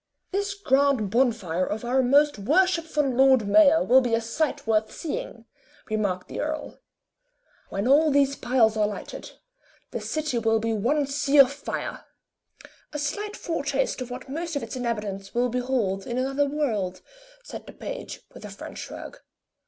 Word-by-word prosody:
"This 400 +1 -1
grand 275 - +2
bonfire 220 -8 +1
of 215 +5 -3
our 255 +2 +2
most 285 0 +3
worshipful 320 - +2
Lord 260 -3 +4
Mayor 315 +7 +6
will 260 +2 +6
be 240 -3 +1
a - - +1
sight 250 +7 -2
worth 220 -1 +1
seeing," 465 +10 -5 0.5
remarked 200 -4 -1
the - - -6
earl. 310 0 -4 0.9
"When 200 +4 -2
all 300 +4 +5
these 280 -1 +3
piles 240 -4 +2
are 210 -1 +2
lighted, 210 - -7 0.6
the - - -4
city 305 -6 -2
will 225 0 +2
be 225 +1 -1
one 275 +8 +1
sea 280 +1 0
of 275 -1 +7
fire." 285 - -5 0.9
"A 295 - -4
slight 405 +9 -3
foretaste 285 -5 -1
of 250 - -5
what 250 - -7
most 325 +4 -4
of 285 - -2
its - - -6
inhabitants 210 -5 -4
will 245 +1 +2
behold 240 -6 -1
in 240 - -3
another 270 +2 +1
world," 215 -11 -2 0.4
said - - -9
the - - -8
page, - - -7
with - - -12
a - - -7
French - - -9
shrug. - - -8
260 Hz, 160 wpm, -25 LUFS, 225-295 Hz, 0.9 s, of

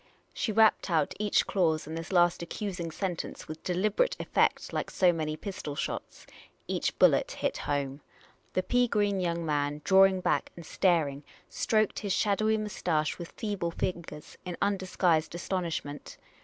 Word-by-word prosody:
' - - -35
' - - -37
She 220 - +1
rapped 220 -1 +4
out 160 -4 +1
each 210 -1 +2
clause 160 -5 +1
in 155 - -7
this 165 +2 -5
last 175 -2 +3
accusing 175 -1 -4
sentence 180 +1 -4
with 155 0 -7
deliberate 210 - +1
effect, - - +1
like - - -2
so 180 -2 +3
many 155 -2 -2
pistol 170 -6 -6
shots. - - -5 0.4
Each - - -1
bullet - - +4
hit - - -2
home. 140 0 -1 0.5
The 185 - +1
pea 245 +3 +2
green 205 -3 +1
young 170 -2 -1
man, 145 -1 -1
drawing 190 0 +5
back - - 0
and 170 - -10
staring, 155 -6 +1 0.3
stroked 215 -2 +1
his 200 -3 -1
shadowy 215 +2 +2
moustache 175 -8 -1
with 170 - -8
feeble 200 -6 -2
fingers 165 -3 -5
in 180 -1 -5
undisguised 185 -5 +1
astonishment. 170 -5 -4
175 Hz, 155 wpm, -29 LUFS, 160-200 Hz, 0.5 s, drawing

